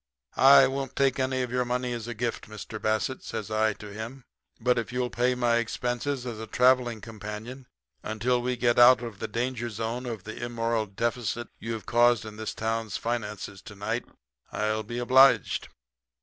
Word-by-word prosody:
"'I 135 0 +8
won't 135 0 -3
take 135 -1 +2
any 130 0 0
of 125 - -5
your 125 0 +1
money 125 0 -2
as 115 -1 -5
a 120 - -5
gift, 115 -1 -3
Mr. 110 +1 -8
Bassett,' 110 +4 -1
says 110 -1 -5
I 110 0 +2
to 105 0 -10
him, 115 +5 -7 0.4
'but 125 +1 +2
if 115 - -5
you'll 125 0 -1
pay 125 +1 +1
my 120 -1 +2
expenses 125 +3 -2
as 115 -3 -5
a 110 - -6
travelling 125 -1 +3
companion 115 +4 -8 0.3
until 120 +3 0
we 125 0 -1
get 120 0 +2
out 120 0 +8
of 115 -4 -7
the - - -3
danger 120 +1 -2
zone 115 +3 -4
of 110 -5 -5
the 110 +3 -7
immoral 115 -2 -1
deficit 120 +2 -2
you 115 +1 -4
have 110 - -6
caused 120 -1 +3
in 105 -1 -9
this 110 0 -5
town's 110 -2 -2
finances 105 -4 -4
to 105 - -11
night, 110 +4 -3 0.5
I'll 110 0 0
be 120 +3 -6
obliged.' 130 +2 +4
120 Hz, 185 wpm, -27 LUFS, 110-125 Hz, 0.5 s, I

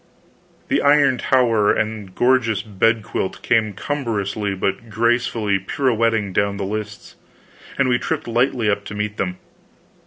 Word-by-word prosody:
The - - +2
iron 140 -3 +4
tower 115 -5 +3
and 110 -2 -2
the - - -17
gorgeous 120 -5 +2
bedquilt 110 -1 -1
came 110 -3 +2
cumbrously 105 -6 -2
but 100 +4 -3
gracefully 115 -2 +1
pirouetting 115 -2 0
down 100 +1 0
the 100 - -3
lists, 105 0 -6 0.6
and 140 - +2
we 120 -1 +2
tripped - - -3
lightly 120 -1 +1
up 100 -1 +1
to 105 - -7
meet 105 0 -3
them. 90 -1 -2
110 Hz, 135 wpm, -20 LUFS, 100-120 Hz, 0.6 s, iron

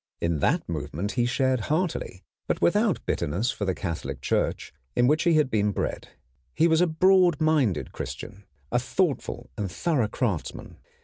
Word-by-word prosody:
In 85 -2 0
that - - +1
movement 85 +5 -3
he 120 -2 +1
shared 130 0 +1
heartily, 155 - -1 0.2
but - - 0
without 205 +1 +2
bitterness 100 - 0
for 100 - -4
the 95 -2 0
Catholic 75 -7 -4
Church, - - -1 0.2
in 120 - +4
which 155 +6 +2
he 170 -2 +4
had 150 -4 +2
been 105 -1 +2
bred. 95 - -3 0.5
He 165 - +4
was 160 0 +3
a 180 - +4
broad 180 0 +4
minded 145 - +1
Christian, 100 +1 -7 0.3
a - - +3
thoughtful - - -2
and 100 -3 -3
thorough 140 - 0
craftsman. 105 - -3
125 Hz, 165 wpm, -26 LUFS, -, 0.5 s, in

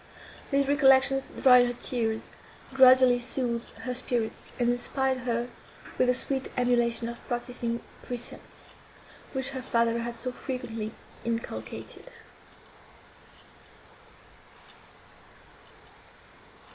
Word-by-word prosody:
These 275 -1 +2
recollections 270 -1 +4
dried 250 -2 +6
her 245 - -2
tears, 230 -2 -1 0.4
gradually 255 -1 +7
soothed 240 -1 -3
her 250 - -3
spirits, 240 -3 -3
and 240 - +1
inspired 260 +2 0
her 235 +1 0 0.5
with 255 - +4
the 250 - +4
sweet 265 +1 -2
emulation 240 -1 +1
of 235 0 -8
practising 240 -1 -3 0.2
precepts, 245 -1 -7 0.6
which 265 0 -1
her 260 -1 -5
father 235 -2 +1
had 235 0 -4
so 255 +2 -4
frequently 245 -4 -5 0.3
inculcated. 230 - -5
245 Hz, 95 wpm, -28 LUFS, 235-260 Hz, 0.6 s, gradually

